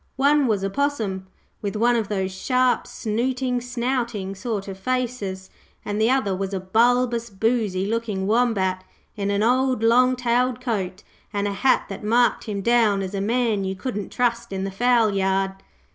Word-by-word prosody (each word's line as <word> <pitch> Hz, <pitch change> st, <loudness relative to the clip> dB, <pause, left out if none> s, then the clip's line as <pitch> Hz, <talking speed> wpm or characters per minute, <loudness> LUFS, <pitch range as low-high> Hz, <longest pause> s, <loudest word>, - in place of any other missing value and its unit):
One 285 Hz, +1 st, +4 dB
was 205 Hz, -4 st, 0 dB
a 195 Hz, -, 0 dB
Possum, 220 Hz, -9 st, -1 dB, 0.3 s
with 205 Hz, 0 st, -3 dB
one 240 Hz, +3 st, +3 dB
of 225 Hz, -3 st, 0 dB
those 190 Hz, -2 st, -2 dB
sharp, 250 Hz, +6 st, +1 dB
snooting, 250 Hz, +3 st, -1 dB
snouting 240 Hz, -5 st, -2 dB
sort 205 Hz, -1 st, -4 dB
of 190 Hz, -1 st, -7 dB
faces, 230 Hz, -6 st, -3 dB, 0.3 s
and 205 Hz, +1 st, -2 dB
the 225 Hz, -, +4 dB
other 250 Hz, -8 st, +1 dB
was 195 Hz, +1 st, -3 dB
a -, -, -1 dB
bulbous, 235 Hz, +4 st, +2 dB
boozy 205 Hz, -2 st, 0 dB
looking 215 Hz, -3 st, -2 dB
Wombat 200 Hz, -5 st, +1 dB, 0.3 s
in 200 Hz, -2 st, -2 dB
an 200 Hz, +1 st, +1 dB
old 255 Hz, 0 st, +2 dB
long 250 Hz, +3 st, +4 dB
tailed 245 Hz, 0 st, +1 dB
coat, 200 Hz, -6 st, -3 dB, 0.3 s
and 205 Hz, -1 st, -1 dB
a 200 Hz, -, -2 dB
hat 255 Hz, +6 st, +2 dB
that 195 Hz, -, -7 dB
marked 240 Hz, +3 st, +2 dB
him 205 Hz, -3 st, -3 dB
down 225 Hz, -4 st, +3 dB
as 190 Hz, +1 st, -5 dB
a 195 Hz, -, -2 dB
man 225 Hz, -1 st, +1 dB
you 190 Hz, 0 st, -2 dB
couldn't 205 Hz, 0 st, -5 dB
trust 235 Hz, -2 st, 0 dB
in 190 Hz, -1 st, -3 dB
the 195 Hz, -, -3 dB
fowlyard. 195 Hz, -4 st, +2 dB
220 Hz, 170 wpm, -23 LUFS, 195-245 Hz, 0.3 s, One